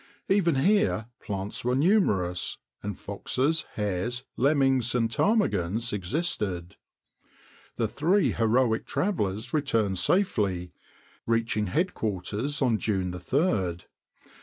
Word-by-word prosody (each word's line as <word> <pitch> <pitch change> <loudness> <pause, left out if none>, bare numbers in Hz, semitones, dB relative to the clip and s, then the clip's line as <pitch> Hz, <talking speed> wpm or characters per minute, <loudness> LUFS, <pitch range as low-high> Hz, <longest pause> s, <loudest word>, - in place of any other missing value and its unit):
Even 185 -5 +3
here 195 - +2
plants 100 -1 -4
were 125 +1 +1
numerous, 105 - +2 0.2
and 100 -2 -5
foxes, 135 +10 -1
hares, 105 +5 -2
lemmings, 135 -3 +2
and 115 -2 +1
ptarmigans 115 - +1
existed. 100 - -2 1.0
The - - 0
three 180 +7 +2
heroic 115 0 +1
travelers 110 - -1
returned 115 - +1
safely, 100 - +1 0.5
reaching 115 -2 +1
headquarters 110 - -1
on 115 -4 +2
June 95 -4 -1
3d. 90 - 0
115 Hz, 95 wpm, -27 LUFS, 100-145 Hz, 1.0 s, Even